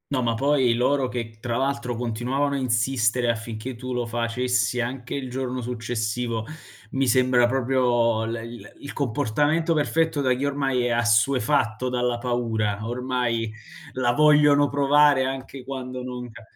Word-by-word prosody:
No, 135 Hz, -3 st, +1 dB
ma 115 Hz, -1 st, +1 dB
poi 135 Hz, -1 st, +2 dB
loro 130 Hz, +3 st, +1 dB
che, 115 Hz, -3 st, -5 dB
tra 120 Hz, 0 st, -3 dB
l'altro, 125 Hz, -2 st, -1 dB
continuavano 125 Hz, +5 st, -1 dB
a -, -, 0 dB
insistere 120 Hz, -1 st, +1 dB
affinché 115 Hz, +2 st, -6 dB
tu 125 Hz, +1 st, -5 dB
lo 125 Hz, -1 st, -1 dB
facessi 120 Hz, +1 st, 0 dB
anche 125 Hz, +1 st, -5 dB
il 135 Hz, -2 st, -4 dB
giorno 130 Hz, 0 st, -3 dB
successivo, 115 Hz, -1 st, -3 dB, 0.5 s
mi 135 Hz, 0 st, 0 dB
sembra 125 Hz, 0 st, +4 dB
proprio 120 Hz, -3 st, +1 dB
l 115 Hz, -, -3 dB
l 115 Hz, +1 st, -8 dB
il 140 Hz, -, -7 dB
comportamento 145 Hz, +5 st, 0 dB
perfetto 160 Hz, 0 st, +1 dB
da 130 Hz, -2 st, +2 dB
chi 125 Hz, +2 st, -3 dB
ormai 135 Hz, -3 st, 0 dB
è 120 Hz, -, 0 dB
assuefatto 115 Hz, 0 st, +2 dB
dalla 125 Hz, -1 st, 0 dB
paura, 115 Hz, -4 st, -1 dB
ormai 120 Hz, -2 st, -2 dB, 0.4 s
la 125 Hz, -2 st, +1 dB
vogliono 145 Hz, 0 st, +5 dB
provare 145 Hz, -1 st, +4 dB
anche 135 Hz, 0 st, -5 dB
quando 130 Hz, -1 st, -6 dB
non 125 Hz, -1 st, -6 dB
che. 115 Hz, +1 st, -13 dB
125 Hz, 150 wpm, -24 LUFS, 115-135 Hz, 0.5 s, vogliono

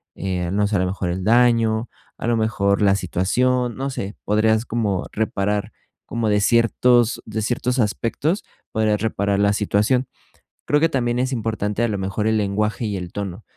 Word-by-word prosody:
eh, 90 Hz, -2 st, -2 dB
no 105 Hz, +1 st, +1 dB
sé, 105 Hz, -, -2 dB
a -, -, +2 dB
lo 90 Hz, -, +1 dB
mejor 95 Hz, -1 st, -3 dB
el 90 Hz, +2 st, -3 dB
daño, 115 Hz, 0 st, +3 dB, 0.3 s
a -, -, -4 dB
lo 120 Hz, -1 st, +2 dB
mejor 105 Hz, -3 st, +1 dB
la 100 Hz, -1 st, +4 dB
situación, 120 Hz, +7 st, 0 dB
no 135 Hz, +1 st, -3 dB
sé, 105 Hz, -6 st, -5 dB
podrías 110 Hz, +2 st, +2 dB
como 105 Hz, -6 st, -1 dB
reparar, 105 Hz, -1 st, -1 dB, 0.3 s
como 115 Hz, -2 st, -2 dB
de 105 Hz, 0 st, +2 dB
ciertos 120 Hz, +1 st, +3 dB
de 110 Hz, 0 st, -3 dB
ciertos 125 Hz, +3 st, -1 dB
aspectos, 120 Hz, -, 0 dB, 0.3 s
podrías 110 Hz, -1 st, +1 dB
reparar 100 Hz, -2 st, 0 dB
la 100 Hz, 0 st, +3 dB
situación. 105 Hz, +5 st, +1 dB, 0.6 s
Creo 145 Hz, -, +3 dB
que 165 Hz, +1 st, +3 dB
también 120 Hz, -4 st, 0 dB
es 130 Hz, +2 st, 0 dB
importante 110 Hz, -2 st, -2 dB
a 120 Hz, -, +2 dB
lo 105 Hz, -, -1 dB
mejor 95 Hz, +3 st, -2 dB
el 110 Hz, 0 st, +2 dB
lenguaje 105 Hz, +3 st, -1 dB
y 105 Hz, -2 st, -2 dB
el 90 Hz, -1 st, -6 dB
tono. 100 Hz, 0 st, -5 dB
110 Hz, 180 wpm, -21 LUFS, 100-120 Hz, 0.6 s, la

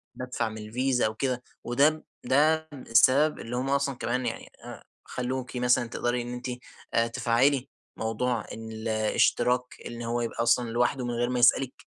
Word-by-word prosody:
بادفع 125 Hz, -3 st, -3 dB
من 110 Hz, -, -8 dB
الفيزا 125 Hz, +4 st, 0 dB
أو 110 Hz, -, -1 dB
كده 125 Hz, 0 st, -2 dB, 0.2 s
وده 145 Hz, +6 st, +2 dB, 0.2 s
ده 155 Hz, +3 st, +3 dB
السبب 135 Hz, +4 st, +3 dB
اللي 120 Hz, +2 st, -5 dB
هم 130 Hz, +2 st, -1 dB
أصلًا 140 Hz, -1 st, +1 dB
كمان 125 Hz, +1 st, -2 dB
يعني -, -, -4 dB, 0.2 s
آآ، -, -, -9 dB, 0.2 s
خلوكِ 125 Hz, 0 st, -4 dB
مثلًا 125 Hz, -1 st, +2 dB
تقدري 120 Hz, +1 st, -1 dB
إن 120 Hz, +1 st, -6 dB
أنتِ 125 Hz, +1 st, -6 dB, 0.5 s
آآ، 115 Hz, 0 st, +3 dB
تفعّلي 130 Hz, +4 st, +1 dB, 0.3 s
موضوع 115 Hz, +1 st, -1 dB
الاشتراك 110 Hz, +2 st, 0 dB, 0.2 s
إن 120 Hz, 0 st, -7 dB
هو 120 Hz, +1 st, -1 dB
يبقى 115 Hz, 0 st, -2 dB
أصلًا 120 Hz, 0 st, +2 dB
لوحده 120 Hz, +2 st, 0 dB
من 120 Hz, -, -2 dB
غير 120 Hz, +1 st, 0 dB
ما 125 Hz, -, -1 dB
يسألكِ، 125 Hz, +2 st, +4 dB
125 Hz, 160 wpm, -27 LUFS, 115-130 Hz, 0.5 s, يسألكِ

